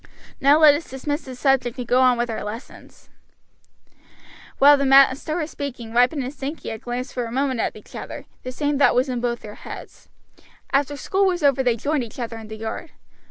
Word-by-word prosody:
Now 280 +2 +5
let 310 -2 +7
us 295 +3 -4
dismiss 290 +4 -4
the 260 -1 -8
subject 260 -2 +1
and 245 -2 -5
go 250 +2 +3
on 250 -1 +4
with 240 0 -1
our 220 - -4
lessons." 215 +5 -10 1.5
While 290 +1 +7
the 280 - -1
master 270 +3 +5
was 320 -2 -3
speaking 245 -5 -6
Ripon 250 +4 +3
and 255 +3 -5
Sankey 290 +2 -6
had 220 -1 -6
glanced 245 +1 -5
for 245 - -2
a 230 - -7
moment 260 -1 -1
at - - -1
each - - -14
other; - - -7 0.2
the 255 - -6
same 290 +2 -1
thought 285 - +5
was 255 +2 +2
in 245 -2 -2
both 240 -1 -2
their 210 -1 -10
minds. - - -10 0.6
After 285 +1 +1
school 390 +6 +1
was 355 -3 -1
over 275 -2 +4
they 245 -3 +2
joined 285 +3 -1
each 225 - -10
other 230 -2 -5
in 220 - -10
the 220 0 -8
yard. 225 +9 -6
260 Hz, 210 wpm, -22 LUFS, 240-285 Hz, 1.5 s, let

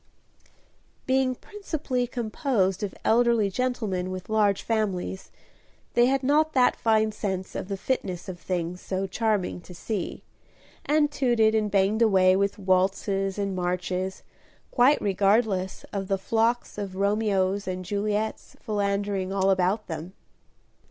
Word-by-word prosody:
Being 260 -1 +2
principally 295 -10 -3
composed 220 -5 -1
of 205 -2 -4
elderly 230 -3 +3
gentlemen 215 -6 -1
with 185 +1 -6
large 210 -2 +2
families, 200 -4 -2 0.6
they 240 0 +5
had 270 +1 +1
not 305 +3 +3
that 255 -2 +4
fine 220 -1 +2
sense 190 -3 -4
of - - -5
the 195 -1 -3
fitness 190 -6 -3
of 180 -2 -7
things 180 0 -3
so 190 0 -2
charming 200 -2 -1
to 180 - -12
see, 200 +1 -4 0.6
and 295 0 +3
tooted 240 -6 +2
and 215 -1 +1
banged 200 +3 +2
away 190 -4 +5
with 200 +1 0
waltzes 195 +1 +1
and 200 -2 -2
marches, 180 +1 -2 0.5
quite 265 +4 +4
regardless 195 -1 +1
of 195 -1 -3
the 195 - +1
flocks 225 +3 0
of 195 -2 -5
Romeos 200 -1 +1
and 185 0 -4
Juliets 210 +3 -2
philandering 200 -2 -1
all 195 0 +2
about 190 +3 +1
them. 165 +2 -6
200 Hz, 130 wpm, -26 LUFS, 190-225 Hz, 0.6 s, they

